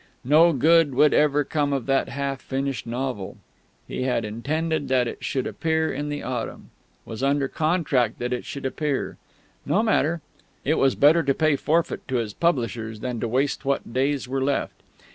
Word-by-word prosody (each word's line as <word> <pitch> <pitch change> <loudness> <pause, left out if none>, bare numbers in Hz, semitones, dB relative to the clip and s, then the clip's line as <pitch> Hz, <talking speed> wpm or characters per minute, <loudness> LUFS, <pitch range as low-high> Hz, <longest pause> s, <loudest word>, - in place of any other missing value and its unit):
No 160 +5 +6
good 155 0 +4
would 150 +2 +5
ever 150 -1 +3
come 145 0 -1
of 135 -4 -2
that 135 0 +1
half 140 -1 -3
finished 135 -2 -3
novel. 120 -4 -4 0.5
He - - -4
had 125 -3 0
intended 150 +7 -2
that 130 -2 +2
it - - -7
should 130 -2 -1
appear 160 -1 0
in 150 0 -3
the 145 0 -4
autumn; 125 -2 -5 0.3
was 110 +2 -7
under 140 0 +2
contract 150 - +1
that 125 +1 -2
it 125 - -3
should 140 -1 -7
appear; 140 +1 -2 0.5
no 180 +10 +1
matter; 170 -7 +1 0.4
it 155 - +2
was 135 -1 +3
better 155 +4 +5
to 140 -3 +1
pay 155 -2 +3
forfeit 160 +4 0
to 130 - -2
his 115 -4 -1
publishers 115 -8 -1
than 125 -2 -3
to 115 - -1
waste 135 +5 0
what 135 -4 -2
days 135 +1 0
were 135 +1 -2
left. 140 0 0
140 Hz, 180 wpm, -24 LUFS, 125-150 Hz, 0.5 s, No